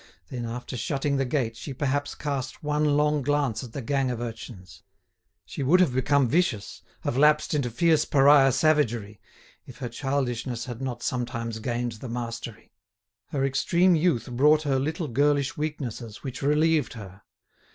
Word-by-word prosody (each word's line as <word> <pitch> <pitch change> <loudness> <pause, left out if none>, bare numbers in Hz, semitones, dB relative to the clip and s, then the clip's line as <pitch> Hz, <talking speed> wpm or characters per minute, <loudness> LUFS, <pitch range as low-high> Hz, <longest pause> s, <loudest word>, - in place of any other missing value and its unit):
Then 120 -2 -4
after 120 +2 -6
shutting 140 +3 -1
the 135 - +1
gate, 125 -3 -1
she 125 +3 -7
perhaps 145 +1 -1
cast 140 -2 -4
one 150 0 +1
long 150 0 +2
glance 140 -3 0
at 120 - -9
the 140 - -5
gang 135 +1 0
of 120 -2 -3
urchins. 110 -6 -8 0.6
She - - -7
would 155 +8 +4
have 175 -9 +3
become 135 +1 +2
vicious, 140 - 0 0.2
have 125 - -1
lapsed 150 +1 +4
into 140 -5 0
fierce 155 +6 +3
pariah 140 -1 +5
savagery, 120 -9 +1 0.5
if 130 - -12
her 125 -4 -5
childishness 125 -3 -2
had 120 -1 -7
not 120 -2 -4
sometimes 115 -2 -3
gained 120 +1 -2
the 115 +3 -8
mastery. 115 -1 -6 0.5
Her 135 -2 -1
extreme 175 +6 +3
youth 160 -6 +1
brought 150 +5 +4
her 135 -3 +1
little 155 +4 -2
girlish 145 +2 +1
weaknesses 130 -7 -5
which 130 -4 -6
relieved 150 +2 +2
her. 100 -4 -11
135 Hz, 160 wpm, -26 LUFS, 120-150 Hz, 0.6 s, pariah